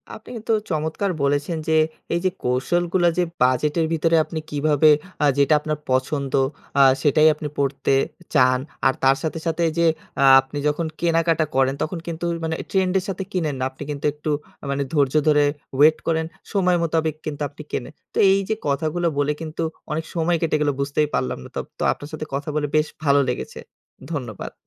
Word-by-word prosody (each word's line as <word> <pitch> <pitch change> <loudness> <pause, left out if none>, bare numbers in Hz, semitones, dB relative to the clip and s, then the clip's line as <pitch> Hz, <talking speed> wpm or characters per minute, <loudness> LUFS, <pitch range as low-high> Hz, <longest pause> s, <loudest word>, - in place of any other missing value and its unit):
আপনি 220 - -13
কিন্তু 225 0 -4 0.2
চমৎকার 160 +5 -1
বলেছেন 145 +4 0
যে, 160 0 +3 0.4
এইযে 180 +2 +1
কৌশলগুলো 175 +8 +1
যে 180 - +3 0.2
বাজেটের 150 +6 +2
ভিতরে 165 +1 +2
আপনি 160 - -5
কিভাবে 150 +1 +3 0.3
আ - - +5
যেটা 140 +2 +4
আপনার 155 0 -3
পছন্দ, 135 +2 0 0.5
আ - - +8 0.2
সেটাই 155 +1 +4
আপনি 150 0 -6
পরতে 140 0 0 0.4
চান। 130 -3 +4 0.3
আর 130 - +3
তার 135 0 +5
সাথে, 160 +1 -2
সাথে 165 +1 -1
এইযে 170 +1 +1 0.4
আ - - +5 0.2
আপনি 135 +2 -9
যখন 150 +3 0 0.2
কেনাকাটা 165 -1 +2
করেন, 135 0 +3
তখন 165 +2 -2
কিন্তু 170 0 -5
ওই 170 - -2
মানে 160 - -1 0.2
ট্রেন্ডের 190 -1 +1
সাথে 190 0 -3
কিনেন 160 -6 -1
না। - - -1
আপনি 140 +2 -9
কিন্তু 145 -1 -5
একটু 150 +1 -5 0.3
আ - - -7
মানে 140 0 0
ধৈর্য 140 -4 +2
ধরে 150 -1 +5 0.3
ওয়েট 155 +3 +6
করেন। 160 -1 +1 0.3
সময় 180 -3 +3
মোতাবেক 160 -1 0
কিন্তু 150 -1 -5
আপনি 145 +2 -12
কেনেন। 125 - -4 0.2
তো - - -6
এইযে 195 +2 +1
কথাগুলো 155 +4 0
বলে 145 +1 +2
কিন্তু 160 0 -5 0.3
অনেক 160 +1 -2
সময় 170 0 +1
কেটে 165 -2 +1
গেলো, 145 -1 +2
বুঝতেই 145 +2 +1
পারলাম 65 0 -1
না। - - -11
তোপ - - -3
তো - - -1
আপনার 145 - -11
সাথে 155 0 -4
কথা 140 +2 -3
বলে 150 -1 0
বেশ 155 0 +3 0.2
ভালো 140 -1 +4
লেগেছে। 125 - -4 0.5
ধন্যবাদ। 120 -9 -5
155 Hz, 180 wpm, -22 LUFS, 140-165 Hz, 0.5 s, আ